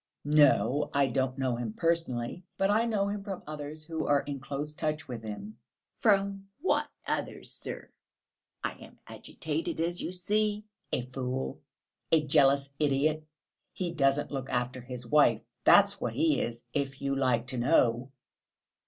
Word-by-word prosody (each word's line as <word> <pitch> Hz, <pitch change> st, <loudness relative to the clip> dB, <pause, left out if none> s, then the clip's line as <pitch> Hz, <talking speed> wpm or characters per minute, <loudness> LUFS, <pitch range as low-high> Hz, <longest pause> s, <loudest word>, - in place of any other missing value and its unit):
"No, 145 Hz, -2 st, +4 dB
I 140 Hz, 0 st, +5 dB
don't 130 Hz, +1 st, -1 dB
know 130 Hz, -2 st, 0 dB
him 115 Hz, -3 st, -4 dB
personally, 165 Hz, -1 st, -1 dB
but 195 Hz, +1 st, +2 dB
I 220 Hz, +3 st, +3 dB
know 210 Hz, -4 st, +1 dB
him 200 Hz, 0 st, -3 dB
from 195 Hz, -3 st, -6 dB
others 150 Hz, 0 st, -6 dB
who 160 Hz, 0 st, -3 dB
are 145 Hz, -1 st, +4 dB
in 140 Hz, -1 st, -5 dB
close 145 Hz, +2 st, -4 dB
touch 155 Hz, 0 st, -2 dB
with 120 Hz, -3 st, -5 dB
him." 115 Hz, -, -7 dB, 0.4 s
"From 195 Hz, -2 st, +2 dB
what 375 Hz, -, +1 dB, 0.2 s
others, -, -, -2 dB
sir? -, -, -4 dB, 0.8 s
I -, -, 0 dB
am -, -, -15 dB
agitated, 335 Hz, 0 st, -4 dB
as 170 Hz, +1 st, 0 dB
you -, -, -3 dB
see...." 210 Hz, +3 st, 0 dB, 0.3 s
"A 125 Hz, -, 0 dB
fool! 125 Hz, -, -4 dB, 0.5 s
A 155 Hz, -2 st, +4 dB
jealous 140 Hz, -1 st, +4 dB
idiot! 150 Hz, +1 st, +2 dB, 0.5 s
He 180 Hz, -2 st, -2 dB
doesn't 140 Hz, -3 st, +1 dB
look 135 Hz, -2 st, -4 dB
after 125 Hz, +1 st, -1 dB
his 125 Hz, 0 st, -7 dB
wife! 150 Hz, +5 st, +4 dB, 0.2 s
That's -, -, +6 dB
what -, -, -1 dB
he 320 Hz, -1 st, +2 dB
is, 120 Hz, 0 st, -4 dB
if 140 Hz, -2 st, -2 dB
you 140 Hz, 0 st, 0 dB
like 125 Hz, -3 st, +2 dB
to 125 Hz, -, -2 dB
know!" 125 Hz, -1 st, +3 dB
145 Hz, 155 wpm, -30 LUFS, 130-175 Hz, 0.8 s, That's